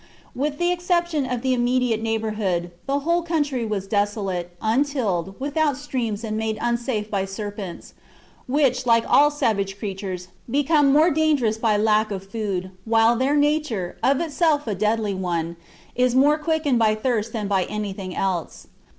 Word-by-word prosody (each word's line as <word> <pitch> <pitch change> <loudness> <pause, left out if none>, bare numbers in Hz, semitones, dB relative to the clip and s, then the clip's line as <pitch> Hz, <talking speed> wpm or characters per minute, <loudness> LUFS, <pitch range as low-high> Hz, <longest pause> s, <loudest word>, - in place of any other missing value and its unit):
With 290 +3 -1
the 350 +2 +1
exception 345 -5 0
of 250 -1 -3
the 260 -1 +2
immediate 245 -2 +1
neighbourhood, 215 -6 -1 0.2
the 280 +1 0
whole 340 +4 +1
country 295 -7 -1
was 205 -3 -2
desolate, 195 -4 -2
untilled, 220 - 0
without 290 0 0
streams, 240 -7 -3
and 215 -1 -3
made 220 0 -2
unsafe 235 -3 -1
by 195 -2 0
serpents, 200 -2 -7 0.5
which, 255 -2 +1
like 230 -1 +4
all 295 +1 +6
savage 200 -9 -1
creatures, 190 -3 -5 0.2
become 290 +2 +3
more 310 +5 +5
dangerous 280 -8 +1
by 220 -2 +2
lack 215 0 +2
of 195 -2 -5
food, 195 -3 -3
while 225 +1 +4
their 265 +4 +1
nature, 290 - 0
of 270 +1 +3
itself 315 -2 +1
a 220 - -1
deadly 210 +1 0
one, 170 -3 -2 0.4
is 250 0 +2
more 290 +4 +4
quickened 305 -5 +1
by 215 -1 +3
thirst 230 -1 -1
than 215 -3 -3
by 195 -2 +1
anything 195 -3 -5
else. 185 -4 -2
225 Hz, 155 wpm, -23 LUFS, 205-285 Hz, 0.5 s, all